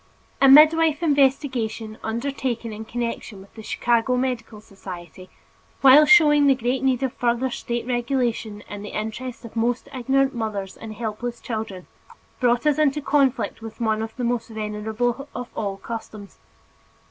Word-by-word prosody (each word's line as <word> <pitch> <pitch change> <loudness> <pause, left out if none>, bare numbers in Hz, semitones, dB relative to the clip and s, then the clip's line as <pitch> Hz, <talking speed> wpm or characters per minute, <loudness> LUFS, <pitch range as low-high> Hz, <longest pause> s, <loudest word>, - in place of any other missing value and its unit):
A 275 - +7
midwife 310 +2 +6
investigation, 260 -7 0
undertaken 235 -1 -3
in 220 +1 -7
connection 230 -3 -4
with 195 +1 -16
the 220 - -10
Chicago 240 +3 +1
Medical 245 -4 -3
Society, 185 -3 -11 0.5
while 275 +3 +8
showing 295 -4 +6
the 270 - +5
great 250 +1 -1
need 265 -1 +1
of 265 -1 -1
further 245 +1 0
state 235 0 -4
regulation 240 -4 -2
in 205 -1 -7
the 205 - -6
interest 235 +3 -6
of 230 - -10
the 230 - -2
most 240 +1 -1
ignorant 270 +1 +1
mothers 210 -5 -4
and 220 -1 -9
helpless 230 +2 -4
children, 215 -5 -5 0.5
brought 240 +1 +2
us 300 0 +2
into 300 -1 +2
conflict 275 -5 +1
with 225 +1 -9
one 220 -2 0
of 225 0 -6
the 250 - -4
most 240 -1 -1
venerable 220 +4 -3
of 250 -1 -6
all 200 -2 -3
customs. 215 -1 -8
240 Hz, 155 wpm, -23 LUFS, 220-265 Hz, 0.5 s, while